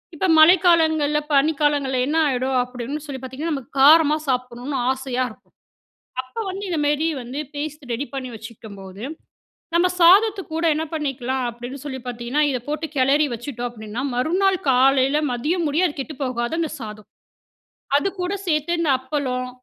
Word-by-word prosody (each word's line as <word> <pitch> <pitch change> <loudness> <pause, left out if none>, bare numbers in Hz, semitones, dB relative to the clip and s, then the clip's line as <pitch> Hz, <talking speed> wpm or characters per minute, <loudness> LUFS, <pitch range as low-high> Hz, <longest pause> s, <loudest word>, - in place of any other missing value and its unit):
இப்ப 370 +4 0
மழைக்காலங்கள்ல, 315 -3 +5
பனிக்காலங்கள்ல 285 -2 +2
என்ன 315 +3 +1
ஆயிடும் 260 -1 0
அப்படீன்னு 250 +4 -6
சொல்லி 265 -3 -6
பார்த்தீங்கன்னா, 285 +6 -4
நமக்கு 270 -3 -7
காரமா 305 +1 +7
சாப்பிடணும்ன்னு 250 +2 -2
ஆசையா 260 -1 -2
இருக்கும். - - -20 0.7
அப்ப 350 - -6
வந்து 390 +2 -5
இந்த 340 - -1
மாரி 295 +2 +1 0.2
வந்து 250 +4 -6 0.2
பேஸ்ட் 300 +1 -5
ரெடி 275 +5 -2
பண்ணி 265 -2 -4
வச்சுக்கும்போது, 210 -3 -10 0.7
நம்ம 345 +2 +4
சாதத்துக்கூட 375 -2 +4
என்ன 315 - -1
பண்ணிக்கலாம் 265 -4 -2
அப்படீன்னு 245 +3 -8
சொல்லி 265 -3 -5
பார்த்தீங்கன்னா, 245 +4 -1
"இத 260 - -1
போட்டு 305 +2 -2
கெளறி 275 +3 +3
வச்சுட்டோம்." 240 0 -5
அப்படீன்னா, 220 +1 -6
மறுநாள் 370 +9 +2
காலையில 265 +2 +4
மதியம் 315 +9 -1
முடிய 335 +6 +2
அது 295 - -7
கெட்டு 305 +3 -6
போகாது, 245 +1 -2
அந்த 325 - -1
சாதம். 215 -1 -9 0.9
அதுக்கூட 370 +4 -2
சேர்த்து 330 +1 +1
இந்த 325 -4 +2
அப்பளம், 260 -2 -3
280 Hz, 145 wpm, -22 LUFS, 250-315 Hz, 0.9 s, காரமா